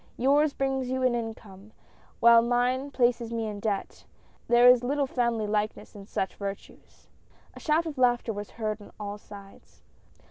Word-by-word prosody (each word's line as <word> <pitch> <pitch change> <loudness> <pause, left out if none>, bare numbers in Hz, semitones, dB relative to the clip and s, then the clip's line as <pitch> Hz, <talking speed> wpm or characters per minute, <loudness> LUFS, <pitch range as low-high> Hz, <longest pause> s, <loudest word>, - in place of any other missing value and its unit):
Yours 285 +4 +3
brings 270 -2 -2
you 260 0 -1
in 255 -1 +3
an 240 -1 -1
income, 210 -2 -13 0.5
while 235 0 +7
mine 245 +3 0
places 240 -3 0
me 230 -1 -2
in 210 -1 -5
debt, 200 -2 -3 0.4
and 240 - +3
there 240 +1 +7
is 250 -1 +6
little 280 +3 0
family 235 -4 -1
likeness 210 0 -2
in 200 -1 -11
such 190 - -3
virtues! 200 -1 -9 0.2
" - - -31
A - - -10
shout 315 +2 +1
of 300 -5 -6
laughter 245 -2 +2
was 205 0 -7
heard 215 -1 -3
on 205 - -13
all 205 0 -6
sides. 200 -1 -15
235 Hz, 180 wpm, -27 LUFS, 210-255 Hz, 0.5 s, while